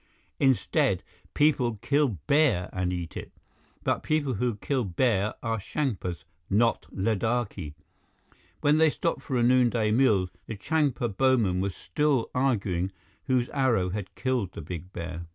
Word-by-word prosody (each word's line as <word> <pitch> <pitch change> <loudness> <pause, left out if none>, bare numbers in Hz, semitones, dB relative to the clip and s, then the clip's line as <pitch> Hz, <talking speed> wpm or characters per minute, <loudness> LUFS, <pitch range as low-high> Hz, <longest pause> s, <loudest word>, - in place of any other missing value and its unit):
Instead, 135 -3 +2 0.3
people 135 -6 +3
kill 140 -7 +2
bear 140 - +2
and 90 -1 -1
eat 90 -2 -5
it. - - -7 0.5
But - - 0
people 150 -4 0
who 120 +1 -1
kill 130 +5 -1
bear 105 +1 +1
are 115 -1 -1
Changpas, 100 - -3 0.3
not 115 +4 +2
Ladakhi!" 105 -5 -1 0.9
When 150 +2 +4
they 160 0 +6
stopped 165 +3 -2
for 130 -4 -2
a 120 - +2
noonday 120 -3 +3
meal, 105 -7 +3 0.2
the 110 - -4
Changpa 135 -4 0
bowmen 115 -9 +2
were 100 - 0
still 130 - 0
arguing 100 -9 0 0.3
whose 130 -2 +1
arrow 120 -10 +1
had 100 -1 -5
killed 125 -8 -1
the - - -7
big 85 +3 -7
bear. 85 -1 -6
115 Hz, 140 wpm, -27 LUFS, 95-130 Hz, 0.9 s, they